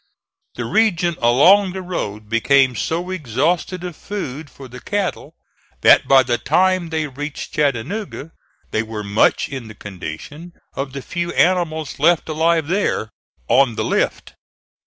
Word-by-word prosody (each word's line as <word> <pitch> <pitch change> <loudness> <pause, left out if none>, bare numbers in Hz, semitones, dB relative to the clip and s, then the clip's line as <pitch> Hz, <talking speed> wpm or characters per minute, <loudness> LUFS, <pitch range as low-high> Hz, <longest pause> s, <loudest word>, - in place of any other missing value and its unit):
The - - -4
region 180 -6 +2
along 180 +12 +5
the 190 -1 -5
road 105 - -5
became 130 +3 +3
so 175 +7 -2
exhausted 170 - -1
of 175 -3 -6
food 155 -8 -6
for 135 0 -12
the 125 +1 -10
cattle 205 +2 -3 0.5
that - - +6
by 135 -1 +6
the 120 -1 -1
time 180 +4 +2
they 160 -1 -1
reached 145 +1 -7
Chattanooga 150 - -2 0.4
they 110 - +1
were 110 -1 -6
much 100 +1 +2
in 130 -4 -7
the 110 - -11
condition 105 - -8 0.2
of 135 -1 -5
the 140 -2 -6
few 175 0 -3
animals 165 -5 +1
left 165 +3 +3
alive 160 +1 +1
there 175 - -1 0.4
"on 125 -1 +3
the - - -1
lift." - - -1
150 Hz, 145 wpm, -20 LUFS, 125-175 Hz, 0.5 s, that